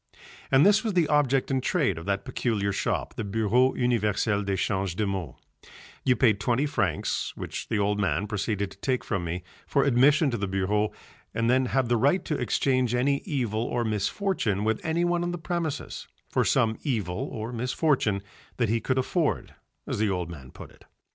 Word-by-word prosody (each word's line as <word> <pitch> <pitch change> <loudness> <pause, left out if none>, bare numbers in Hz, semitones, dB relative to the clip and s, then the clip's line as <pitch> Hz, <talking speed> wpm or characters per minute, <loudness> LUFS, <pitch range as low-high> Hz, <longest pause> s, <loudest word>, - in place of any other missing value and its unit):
And 135 +2 +5
this 205 +2 +5
was 220 -3 -1
the 175 -4 +3
object 140 -3 +2
and 130 -1 +1
trade 130 - +1
of 85 - -10
that 100 0 -1
peculiar 110 -6 -1
shop, - - -1
the - - -2
Bureau 110 +5 +2
Universel 105 -3 +1
d'Echange 95 -2 -1
de 105 - 0
Maux: 95 -9 -3 0.7
you 125 - +3
paid 110 -7 +3
twenty 120 +6 +1
francs, 95 - -1
which - - -5
the 110 - 0
old 105 0 +1
man 90 -1 0
proceeded 105 -1 -2
to - - -15
take 130 -2 -1
from 95 -6 -2
me, 85 +1 -4 0.2
for 140 - +2
admission 140 +3 +4
to 120 - -1
the 100 - -2
bureau 100 +3 0 0.4
and 115 +1 +2
then 130 0 +3
had 130 0 +1
the 120 0 +2
right 140 +11 +2
to 155 - -1
exchange 130 -4 +1
any 140 +3 +2
evil 120 - -1
or 120 0 -1
misfortune 110 - 0
with 110 0 0
anyone 175 +2 +1
on 175 - -1
the 175 - -3
premises 165 -2 -4 0.2
for - - +2
some 110 -1 +2
evil 105 - -2
or 115 +2 -5
misfortune 120 -4 0 0.3
that 120 -4 +1
he 115 +1 +1
"could 130 - 0
afford," 150 +4 0 0.3
as - - -3
the 110 -1 +2
old 90 -3 -2
man 65 -6 -10
put - - -11
it. - - -21
115 Hz, 185 wpm, -27 LUFS, 100-135 Hz, 0.7 s, And